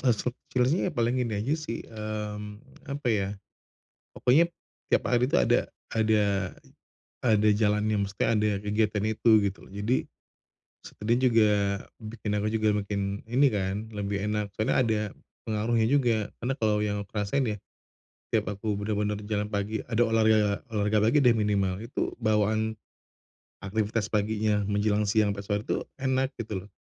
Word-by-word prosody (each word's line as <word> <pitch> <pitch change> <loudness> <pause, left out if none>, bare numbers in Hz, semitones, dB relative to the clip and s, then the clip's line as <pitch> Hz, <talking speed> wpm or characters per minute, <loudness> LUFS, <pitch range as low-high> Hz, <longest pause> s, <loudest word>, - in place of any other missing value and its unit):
Eee, 125 -6 +3
seb 125 +3 -2 0.2
sebenernya 130 +9 +2
paling 120 +2 +1
ini 115 -3 -1
aja 115 +8 -1
sih, 155 -7 -5
mmm, 105 0 -7
apa 140 -1 -5
ya, 100 -2 0 0.8
pokoknya 160 +7 +3 0.4
tiap - - +3
hari 125 +1 +2
itu - - +4
ada 60 - +2 0.2
ada 110 -1 +3 1.1
ada 110 -2 +4
jalannya, 105 -1 +2
maksudnya 100 0 -1
ada 105 0 +2
kegiatan 105 0 0
itu 110 +2 +1 0.2
gitu 95 - -13
loh, - - -17
jadi 105 +5 0 0.8
sekalian 115 +3 -1
juga 115 -2 +4 0.5
bikin 110 -1 -6
aku 105 - 0
juga 110 0 +1
makin 100 0 -3
ini 130 +5 +4
kan, 95 -1 -1 0.2
lebih 100 -1 -2
enak 105 -1 -1
soalnya 110 - +1
ada 110 -3 +1 0.4
pengaruhnya 110 +1 +1
juga 115 -7 +2
karena 125 +3 -1
kalau 110 -4 +1
yang 105 -1 0
aku - - -28
rasain 130 +7 0
ya, - - -4 0.8
tiap - - +1
aku 105 +1 -2
bener-bener 105 0 -1
jalan 105 0 0
pagi 105 +1 -2
ada 120 0 +1
olahraga 110 -2 +3 0.2
olahraga 105 +1 +2
pagi 140 +5 +4
deh 120 -3 +5
minimal, 100 -3 +1
itu 125 - -3
bawaan 110 0 +1 0.9
aktivitas 105 +1 -1
paginya 105 -1 +1
menjelang 105 +1 +1
siang 105 -1 +2
pas 100 - -6
waktu 105 +2 -2 0.2
enak 130 0 +1
gitu 100 -4 -5
loh, - - -15
105 Hz, 150 wpm, -27 LUFS, 105-115 Hz, 1.1 s, deh